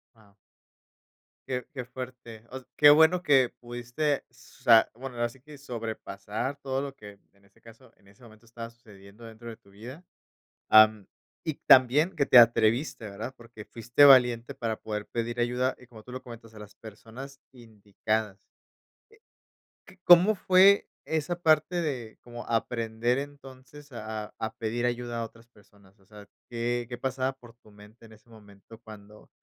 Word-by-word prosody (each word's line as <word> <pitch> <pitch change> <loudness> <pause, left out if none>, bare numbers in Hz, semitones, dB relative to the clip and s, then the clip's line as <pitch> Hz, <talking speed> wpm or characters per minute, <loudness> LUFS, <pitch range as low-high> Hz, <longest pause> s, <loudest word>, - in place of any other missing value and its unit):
Guau. 105 -3 -24 1.1
Qué 125 -2 -3
qué 125 -3 -7
fuerte. 125 -3 -10
Os 130 0 -9
qué 150 - +7
bueno 160 +4 +5
que 135 -7 +3
pudiste, 120 +5 -3
o - - -36
sea, 115 -1 +2
bueno, 125 +1 -9
ahora 120 0 -1
sí 125 +2 -19
que 150 +1 -14
sobrepasar 110 -1 -6
todo 135 0 -3
lo 140 -1 -7
que, 105 -4 -14
en 100 0 -29
ese 100 +3 -28
caso, 115 +2 -18
en 100 - -27
ese 100 +5 -22
momento 110 0 -18
estaba 115 0 -9
sucediendo 105 -1 -17
dentro 115 +1 -11
de 110 - -10
tu 115 -4 -25
vida, 120 - -12 0.7
am, 110 -2 +5 0.4
y 160 - -3
también 145 +8 +5
que 140 -3 +1
te 125 - +7
atreviste, 115 +1 +3
¿verdad? 105 +6 -7
Porque 115 -2 -13
fuiste 120 +6 +2
valiente 125 -4 +5
para 115 -2 -4
poder 105 -1 -5
pedir 120 +1 -4
ayuda, 125 +2 -1
y 125 - -17
como 110 -3 -15
tú 125 - -15
lo 130 +1 -8
comentas, 115 -2 -13
a - - -12
las 105 -1 -13
personas 120 +5 -12
indicadas, 110 -3 -4 1.5
eh, 180 - -15
¿c 190 - -27
cómo 180 +5 +6
fue 190 +1 +4 0.2
esa 160 +2 -3
parte 165 +2 +2
de 125 -8 -5
cómo 120 0 -10
aprender 115 +1 -1
entonces 140 0 -11
a 110 -1 -6
a - - -17
a 110 0 -5
pedir 115 +2 -3
ayuda 120 -1 -3
a - - -2
otras 115 +1 -12
personas? 100 -3 -24
O 95 - -26
sea, 105 0 -15 0.2
¿qué 120 0 -2
qué 120 - -6
pasaba 130 +1 -2
por 125 -3 -17
tu 110 -2 -22
mente 105 +3 -18
en 110 - -20
ese 110 +2 -20
momento 105 -1 -17
cuando 105 -1 -15
120 Hz, 170 wpm, -27 LUFS, 110-130 Hz, 1.5 s, qué